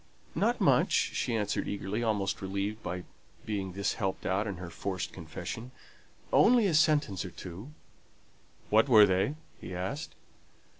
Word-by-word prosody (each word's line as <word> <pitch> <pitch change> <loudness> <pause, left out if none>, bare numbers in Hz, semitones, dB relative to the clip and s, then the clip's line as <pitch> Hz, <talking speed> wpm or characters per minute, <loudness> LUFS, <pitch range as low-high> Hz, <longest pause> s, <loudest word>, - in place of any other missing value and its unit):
"Not - - +1
much," - - +4 0.2
she 115 - -1
answered 105 -2 -1
eagerly, 100 +2 -3
almost 105 -4 0
relieved 100 +3 -3
by 90 -2 -4 0.4
being 100 -4 -3
thus 100 +1 -1
helped 95 -3 -3
out 100 +4 0
in 100 - -3
her 90 -1 -7
forced 95 -3 -4
confession. 90 +7 -6 0.6
"Only 235 -1 +6
a 185 - +2
sentence 150 - +3
or 95 - -6
two." 90 +8 -9 1.0
"What 110 +6 +5
were 110 -4 +9
they?" 95 +9 +1 0.2
he 90 - -7
asked. 95 - -4
100 Hz, 145 wpm, -30 LUFS, 95-115 Hz, 1.0 s, were